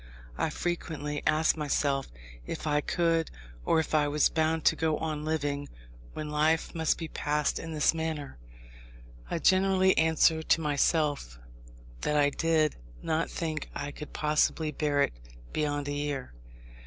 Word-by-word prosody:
I - - 0
frequently 150 -4 -3
asked 155 +1 +3
myself, 140 -2 0 0.4
if - - -5
I 150 -1 +2
could, 165 0 +1 0.3
or 160 - +3
if 160 - -3
I 150 -1 +3
was 150 0 +3
bound 160 -1 0
to - - +5
go 160 -1 0
on 155 -2 -3
living, 145 -2 -2 0.4
when 150 -1 -5
life 155 +2 +1
must 160 -2 +1
be 165 - -5
passed 150 -1 -1
in 165 - -6
this 150 0 +3
manner. 160 - -4 0.9
I - - -1
generally 190 +1 +4
answered 160 0 +3
to - - +5
myself 145 - 0 0.6
that 150 - 0
I 145 -1 +4
did 160 -1 +1 0.3
not 160 +1 0
think 155 -3 -4
I 145 0 -4
could 150 - -9
possibly 155 +1 +1
bear 145 -1 +1
it - - -1 0.4
beyond 145 -1 -1
a 145 - -2
year. 145 - -3
155 Hz, 150 wpm, -29 LUFS, 145-160 Hz, 0.9 s, to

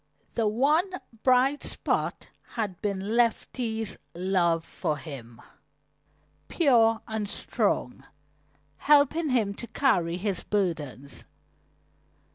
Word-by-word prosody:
The 225 -2 +1
one 300 - +2 0.3
bright 260 +3 +3
spot - - -2 0.2
had 205 -6 -3
been 200 +1 -2
Letty's 230 -1 0 0.2
love 175 -2 +1
for 150 - -2
him, 125 -7 -9 1.1
pure 230 -8 +3
and 220 -2 -3
strong, 135 - -1 0.7
helping 295 +2 +4
him 225 -6 +1
to 235 - -8
carry 180 -9 +1
his 195 -1 -2
burdens. 150 - -3
215 Hz, 90 wpm, -27 LUFS, 175-250 Hz, 1.1 s, helping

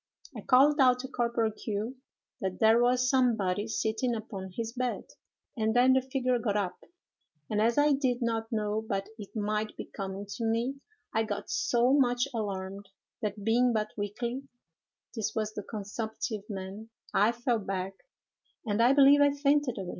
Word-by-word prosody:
I - - -6
called 285 +4 +5
out 255 -2 +6
to 260 - -6
Corporal 235 -3 0
Q—— 215 +3 -4 0.4
that 190 -4 -3
there 225 +2 +5
was 250 +1 +3
somebody 220 -6 +2
sitting 225 +2 -1
upon 200 -4 -6
his 230 0 -3
bed, 250 -1 -2 0.5
and 220 -1 0
then 255 +2 +6
the 265 - +4
figure 255 -1 0
got 210 -3 0
up; 195 -3 -2 0.7
and 210 0 +1
as 230 +3 +2
I 295 +1 +5
did 260 -3 +1
not 225 -2 -2
know 215 -1 -1
but 195 0 -2
it 205 +1 -10
might 215 0 -2
be - - -5
coming 195 0 -6
to 235 - -4
me, 230 +4 0 0.4
I 220 - +2
got 215 -2 -4
so 245 +2 +2
much 250 -2 +3
alarmed, 200 -2 -4 0.3
that 210 -1 -3
being 240 +3 +3
but 215 -1 -1
weakly' 235 +5 -3 0.7
(this 220 -2 -3
was 215 -1 -1
the 210 - -4
consumptive 215 +1 -5
man), 195 +2 -6 0.2
'I 210 +3 +4
fell 240 -1 0
back, 195 -1 -3 0.7
and 210 0 +1
I 245 +3 +6
believe 285 +1 +7
I 285 -1 +5
fainted 285 -3 +2
away. 190 -2 -5
225 Hz, 170 wpm, -29 LUFS, 205-250 Hz, 0.7 s, believe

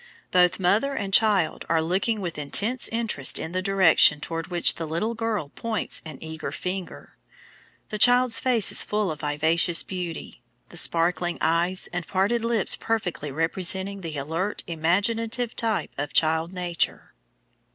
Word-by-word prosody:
Both 180 0 +3
mother 215 +10 +1
and 195 -5 -4
child 200 -6 +2
are 165 - +2
looking 190 +7 -1
with 170 -4 -5
intense 205 - +1
interest 225 - +1
in 160 - -5
the 185 +1 -2
direction 185 -6 +4
toward 165 +1 -5
which 175 -1 +3
the 165 - -6
little 170 +9 -2
girl 225 -9 -3
points 225 +7 -2
an 155 -4 -9
eager 160 0 -6
finger. 185 0 -7 0.7
The 215 - -5
child's 245 0 +5
face 245 -5 +3
is - - +5
full 210 -4 -2
of 155 - -7
vivacious 160 +4 +2
beauty, 175 -8 -7 0.3
the 175 - -5
sparkling 170 +1 +1
eyes 170 +3 +1
and 175 -1 -4
parted 205 +5 0
lips 230 -3 +1
perfectly 190 -9 -3
representing 190 +5 0
the 160 -4 -6
alert, 165 +8 -3
imaginative 220 +8 -1
type 225 -3 -1
of 145 0 -4
child 160 +1 +2
nature. 180 -2 -3
180 Hz, 150 wpm, -24 LUFS, 165-215 Hz, 0.7 s, child's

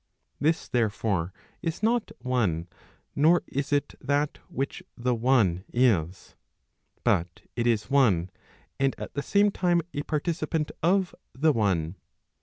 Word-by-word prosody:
This, 160 +3 +1
therefore, 100 -6 0 0.3
is 165 +3 -3
not 230 +1 +2
one, 110 -11 0 0.5
nor 160 +5 +4
is 140 +2 -3
it 145 0 +1
that 145 +2 0
which 135 +1 -3 0.2
the 125 +1 +1
one 115 -7 +2
is. 95 -8 +1 0.7
But 85 0 +1
it 120 0 0
is 110 -1 +1
one, 100 -11 +3 0.5
and 135 0 +2
at - - -7
the 140 - -2
same 205 +7 +3
time 175 -3 +1
a 145 - -2
participant 155 0 -1
of 185 +2 +2 0.2
the 150 +3 +3
one. 95 - 0
130 Hz, 130 wpm, -27 LUFS, 100-155 Hz, 0.7 s, nor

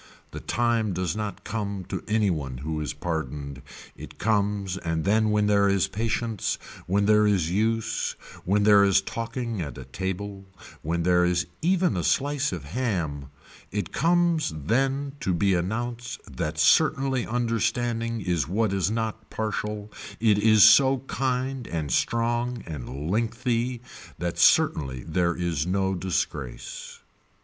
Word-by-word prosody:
The - - -6
time 115 -3 0
does 90 -3 -2
not 105 -1 -4
come 100 -4 -4
to - - -4
any 105 -2 +2
one 70 -6 -4
who 75 +3 -3
is 75 - -2
pardoned, 70 -4 -4 0.3
it - - -11
comes 100 -3 0
and 80 -3 -2
then 110 +2 +3
when 105 0 +2
there 100 -1 +4
is 100 -2 +2
patience 115 0 -2 0.3
when 100 +3 +2
there 105 0 +5
is 90 -5 +1
use, 115 +3 0 0.3
when 100 +3 +2
there 100 -1 +7
is 100 -1 +5
talking 115 +1 -4
and 70 -3 -6
a 65 - -7
table, 95 +7 -5 0.4
when 85 +2 -1
there 90 0 +4
is 90 0 +1 0.2
even 180 - +2
a 90 - -1
slice 145 - +1
of - - -5
ham, 85 - -2 0.4
it 100 -4 -4
comes 170 +1 +2
then 135 - +1
to 95 -9 0
be 100 +2 +2
announced 120 +6 -3 0.2
that 80 -3 -3
certainly 135 - +3
understanding 115 0 -1
is 85 -8 0
what 105 +3 0
is 95 -1 +1
not 110 0 -3
partial, 105 -1 -3 0.3
it 110 -2 +3
is 110 0 +6
so 130 +4 +6
kind 130 -1 -2
and 80 -5 -3
strong 120 - 0
and 75 0 -5
lengthy 120 +2 -1 0.3
that 85 -1 -3
certainly 65 -4 +3
there 85 +1 0
is 85 -3 -1
no 95 +1 +1
disgrace. 80 -8 -4
105 Hz, 145 wpm, -26 LUFS, 90-115 Hz, 0.4 s, there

